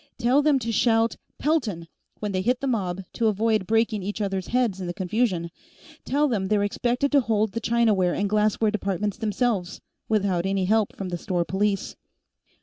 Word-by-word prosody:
Tell 250 +4 +3
them 295 -1 +3
to 230 -3 -3
shout 225 0 +2 0.2
'Pelton!' 235 - -1 0.3
when 210 -1 -3
they 185 -1 -1
hit 245 +5 +1
the - - -3
mob, 195 -7 -1
to 230 - +1
avoid 215 -1 +1
breaking 225 -1 +1
each 205 +3 -4
others' 195 -3 -2
heads 235 -6 0
in 180 - -4
the 175 - -4
confusion, 190 -1 0
and 170 - -7 0.5
tell 295 +2 +2
them 205 -7 -1
they're 205 0 +2
expected 245 +6 0
to 285 -2 +5
hold 220 -3 0
the 230 - -4
Chinaware 215 -7 +2
and 200 - 0
Glassware 215 +1 +2
departments 200 -1 -2
themselves, 210 -4 -1 0.3
without 195 -4 +1
any 195 -1 0
help 215 +1 +1
from 190 -2 -5
the 175 -1 -4
store 175 -1 -1
police." 195 +2 -1
210 Hz, 185 wpm, -25 LUFS, 190-235 Hz, 0.5 s, to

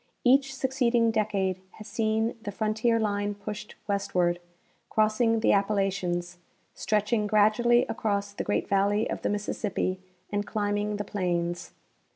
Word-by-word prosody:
Each 270 +1 +4
succeed 260 -2 0
ing 230 -1 +4
decade 195 -4 0
has 215 - -11
seen 220 +1 0
the 210 -2 -5
frontier 220 +3 +1
line 205 -1 -1
pushed 210 +1 -7
westward, 180 -4 0 0.5
crossing 220 +1 +2
the - - +4
Appalachians, 190 -3 0 0.3
stretching 210 0 0
gradually 215 +4 +4
across 205 -2 -2
the 200 - -4
great 105 0 -1
valley 200 +2 +2
of - - -4
the - - 0
Mississippi, 205 -2 -2 0.3
and 205 0 0
climbing 205 0 -1
the 205 - -3
plains. 175 -3 -2
210 Hz, 135 wpm, -27 LUFS, 200-220 Hz, 0.5 s, Each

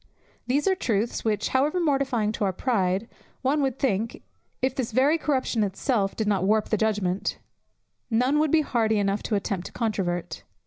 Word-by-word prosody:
These 280 +7 +1
are 385 - +5
truths 230 - -1
which, 215 -2 0
however 290 +7 +1
mortifying 270 -9 +1
to 215 - -3
our 195 - +2
pride, 195 -1 0 0.4
one 285 +3 +2
would 265 -3 0
think 230 -3 -1 0.4
(if 260 0 0
this 255 -3 -3
very 280 +7 +3
corruption 260 -7 0
itself 200 +1 0
did 220 - -1
not 195 -3 +1
warp 215 +2 +2
the - - +2
judgment) 205 -3 0 0.7
none 250 +6 +2
would 310 0 +2
be 315 +2 +4
hardy 225 -6 +1
enough 200 0 0
to 215 - -1
attempt 195 -2 -2
to - - -12
controvert. 175 -7 -2
225 Hz, 175 wpm, -26 LUFS, 200-265 Hz, 0.7 s, are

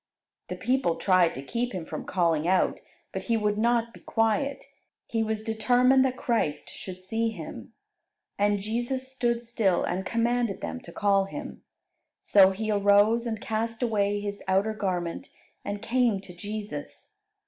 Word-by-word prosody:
The - - -4
people 255 -9 +1
tried 185 -3 +3
to 135 - -6
keep 240 - -2
him 180 -4 -4
from - - -6
calling 165 -4 +1
out, 185 0 +2 0.3
but - - -5
he 230 -2 +2
would 210 -1 0
not 235 0 +2
be - - -13
quiet. 225 +5 0 0.4
He 225 - -1
was 220 -1 -1
determined 250 +4 +4
that 255 -1 -1
Christ 225 -11 -1
should 185 -1 -8
see 225 +5 -1
him. 225 - -8 0.6
And 205 0 +2
Jesus 240 +5 -2
stood 240 -2 0
still, 220 -6 +1
and 180 +2 -1
commanded 235 +1 0
them 255 - -4
to - - -12
call 200 -1 +2
him. 195 - -8 0.6
So 195 -2 +6
he 215 +3 -2
arose 205 +3 +4
and 220 -2 -3
cast 225 +2 -2
away 205 -3 +1
his 205 0 -5
outer 195 +3 +2
garment 180 -5 -3 0.3
and 205 +1 -4
came 235 -3 +2
to 185 -2 -11
Jesus. 210 - -7
215 Hz, 160 wpm, -27 LUFS, 195-235 Hz, 0.6 s, So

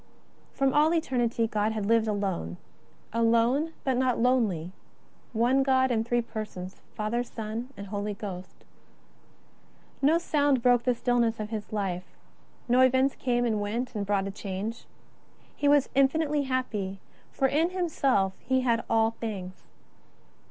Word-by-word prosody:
From 270 -1 +1
all 310 +3 +4
eternity 240 -7 0
God 215 0 0
had 215 -2 -2
lived 225 +1 +3
alone; 190 - -2 0.6
alone, 235 +7 +2
but 260 -2 +1
not 255 -1 +2
lonely; 220 -9 +1 0.6
One 245 +4 +3
God 260 -1 +3
in 225 -2 +1
Three 240 +1 0
Persons, 215 -5 -7
Father, 220 +3 -1
Son, 225 +1 -6
and 200 - -6
Holy 205 +1 -3
Ghost. 185 -3 -8 1.4
No 300 +4 +4
sound 285 -6 +1
broke 245 -1 +4
the 250 -1 +2
stillness 235 -2 +1
of 215 +1 -5
His 215 -2 -5
Life; 185 -4 -3 0.5
no 250 +1 +4
events 260 +1 +4
came, 245 -1 0
and 215 -3 0
went, 230 +5 -3
and 210 -3 -2
brought 200 -1 0
a 195 - -3
change. 200 +3 -5 0.7
He 290 - 0
was 285 -1 +5
infinitely 290 +2 +2
happy; 210 -7 -2 0.3
for 270 - +1
in 310 +5 +2
Himself 275 - +1
He 260 0 0
had 235 -2 +1
all 225 0 +3
things. 195 -5 -6
230 Hz, 145 wpm, -28 LUFS, 210-260 Hz, 1.4 s, was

